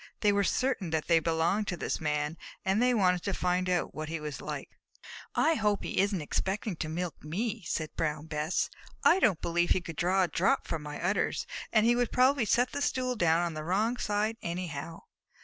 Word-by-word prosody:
They 210 - +4
were 200 0 +2
certain 255 -4 0
that 160 -1 -1
they 165 -1 +4
belonged 165 +6 +1
to 175 - -2
this - - -2
Man, 150 0 -1 0.3
and 195 +4 +2
they 250 0 +4
wanted 180 -4 +3
to 200 0 -2
find 180 0 0
out 180 -1 0
what 155 0 -5
he 165 0 -3
was 150 -2 -6
like. - - -5 0.6
"I 325 - +4
hope 210 -7 +1
he - - -2
isn't 195 -4 +1
expecting 195 +5 -2
to 155 - -3
milk 170 +1 -4
me," 200 +9 -2
said 155 -1 -3
Brown 150 -1 -1
Bess. 155 +2 -1 0.3
"I 360 - +6
don't 205 - +3
believe 175 +1 +1
he - - +4
could 165 -3 -8
draw 185 +2 +3
a - - +2
drop 195 +11 +1
from 165 - -3
my 150 0 -6
udders, 180 +4 0 0.3
and 220 -1 +4
he 240 +1 +5
would 245 -1 0
probably 255 0 +4
set 245 +4 +2
the 285 - -3
stool 255 -3 0
down 170 -5 +3
on 170 -1 -2
the 155 0 -5
wrong 210 +8 +1
side 215 0 0
anyhow." 170 -3 -5
180 Hz, 210 wpm, -30 LUFS, 160-215 Hz, 0.6 s, I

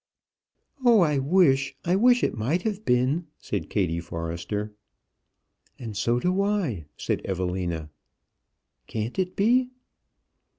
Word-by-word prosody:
"Oh, 235 -4 +6
I 150 -4 +3
wish, 135 -3 +3
I 175 +2 +2
wish 245 +4 +4
it - - +1
might 135 +11 -1
have 215 -1 -3
been!" 130 +7 +1
said - - -4
Kattie 85 -5 0
Forrester. 85 +5 -4 1.0
"And 115 -4 -7
so 120 +4 +1
do 185 +6 +1
I," 185 - -1
said - - -2
Evelina. 90 -4 -3 1.0
"Can't 110 - -4
it 180 -1 -1
be?" 250 +5 +3
135 Hz, 120 wpm, -26 LUFS, -, 1.0 s, Oh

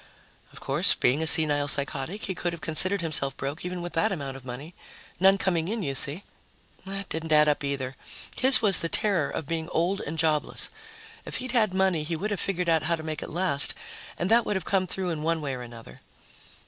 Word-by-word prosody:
Of - - -11
course, - - +2
being 135 +5 +1
a 160 - 0
senile 150 -3 +6
psychotic, 140 +7 -3
he 190 - -2
could 175 -1 -3
have 170 - -7
considered 185 +5 +2
himself 140 -5 -1
broke 140 +4 -4
even 180 0 -4
with 175 - -6
that 210 +6 +1
amount 140 -7 -4
of 135 - -11
money. 130 +7 -8 0.5
None 195 +1 +5
coming 170 -4 0
in, 220 +1 -2
you 140 -4 -2
see. 145 +7 -2 0.6
That 195 0 -4
didn't 160 0 -4
add 150 0 +6
up, 150 -1 +1
either. 135 -2 -3 0.4
His 260 -1 +5
was 200 -3 +4
the 165 - -2
terror 180 -9 +1
of 160 - -4
being 160 +2 -3
old 180 +5 0
and 160 - -5
jobless. 155 -2 0 0.5
If - - -5
he'd 255 -1 -3
had 215 -6 +2
money, 190 -4 +2
he 160 +2 -3
would 210 +6 -3
have 205 - -2
figured 180 -2 -2
how 165 0 +2
to 160 - -9
make 155 -1 -4
it - - -6
last, 170 -5 +3 0.4
and 175 +4 -2
that 235 +1 +5
would 210 - -2
have 190 - -3
come 190 -2 +1
through 185 -1 -1
in 155 -2 -4
one 165 +1 0
way 145 -3 -3
or 125 - -6
another. 115 - -11
165 Hz, 220 wpm, -26 LUFS, 145-190 Hz, 0.6 s, senile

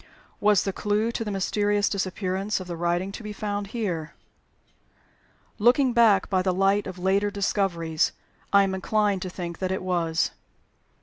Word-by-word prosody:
Was 205 -2 +4
the 195 - -2
clew 210 +3 0
to 235 - -3
the 215 - -4
mysterious 205 +1 +1
disappearance 195 +1 -2
of 185 - -7
the 175 -1 -5
writing 175 +3 -1
to 200 - -8
be 210 -1 -6
found 205 -1 -3
here? 185 -8 -3 1.4
Looking 245 +3 +4
back 220 -5 +4
by 185 -2 +1
the 185 -1 0
light 195 +2 +2
of 185 -1 -7
later 195 +3 +1
discoveries, 185 -5 0 0.4
I 200 0 +6
am 195 -1 -1
inclined 205 0 0
to 185 - -4
think 175 -2 -6
that 185 -1 -1
it 190 - -2
was. 170 -3 0
195 Hz, 165 wpm, -25 LUFS, 185-205 Hz, 1.4 s, I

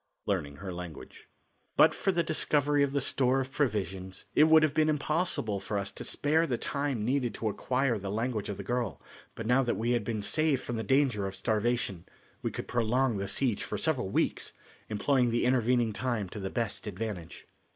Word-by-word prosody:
Learning 70 -1 -1
Her 95 +3 -6
Language. 90 -2 -9 0.5
But - - +7
for 195 - 0
the 170 -2 +1
discovery 150 -2 +2
of 140 -1 +2
the 140 - +1
store 130 0 +2
of 130 0 -3
provisions 95 -9 -2
it 155 - +6
would 160 0 +6
have 155 -2 +2
been 155 0 +3
impossible 150 - 0
for 100 +2 -3
us 100 0 -2
to - - -8
spare 160 +3 +2
the 125 - 0
time 140 -6 -2
needed 125 -3 0
to 110 - -1
acquire 125 +1 0
the 100 0 -5
language 110 0 -2
of 100 - -4
the 100 - -6
girl, 120 - -2 0.4
but 115 - -5
now 125 +4 +4
that 120 -3 0
we 115 +2 0
had 120 -3 +1
been 105 0 -3
saved 155 +2 +1
from 120 - -3
the - - -1
danger 120 -3 +2
of 95 - -6
starvation, 110 -5 -1 0.3
we - - -1
could - - -6
prolong 120 0 +1
the 100 0 -3
siege 120 0 0
for - - -3
several 140 -11 0
weeks, - - 0 0.4
employing 125 +4 +2
the 120 +1 +1
intervening 120 -2 +2
time 120 -4 -1
to 105 - -7
the 95 -1 -3
best 115 -2 -3
advantage. 100 -4 -5
120 Hz, 200 wpm, -30 LUFS, 100-135 Hz, 0.5 s, But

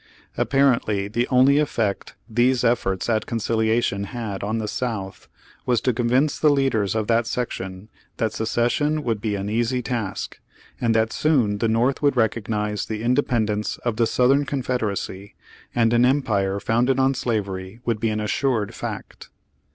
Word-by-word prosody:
Apparently 120 -8 +2
the 120 +4 -1
only 130 +3 +5
effect 115 -9 -1
these 120 +2 +2
efforts 95 -5 +1
at 110 -2 0
conciliation 110 -2 0
had 105 -3 -5
on 110 +3 -2
the 110 -1 -2
South, 110 -4 -4 0.4
was 125 -2 +3
to 125 - +1
convince 125 +5 +1
the 155 - +4
leaders 130 -8 +1
of 110 -1 0
that 115 +1 +1
section, 95 -6 -4 0.3
that 110 - -1
secession 120 +7 0
would 115 -5 -1
be 105 -2 -1
an 100 0 -3
easy 120 +3 0
task, 115 -5 -4 0.4
and 115 -2 +2
that 110 0 +2
soon 120 -10 +2
the 115 - +1
North 120 +4 +1
would 145 -2 +3
recog 115 -2 0
nize 105 -1 -1
the 110 0 -4
independence 115 -5 0
of 115 -3 -1
the 115 -1 +3
Southern 130 +5 +3
Confed 130 -2 -2
eracy, 100 -1 -4 0.4
and 115 -1 +3
an 120 +1 +4
empire 105 -7 +1
founded 120 +5 +1
on 135 +1 +3
slavery 100 -5 -3
would 115 -3 0
be 115 0 0
an 110 0 -1
assured 105 0 0
fact. - - -7
115 Hz, 160 wpm, -23 LUFS, 105-125 Hz, 0.4 s, only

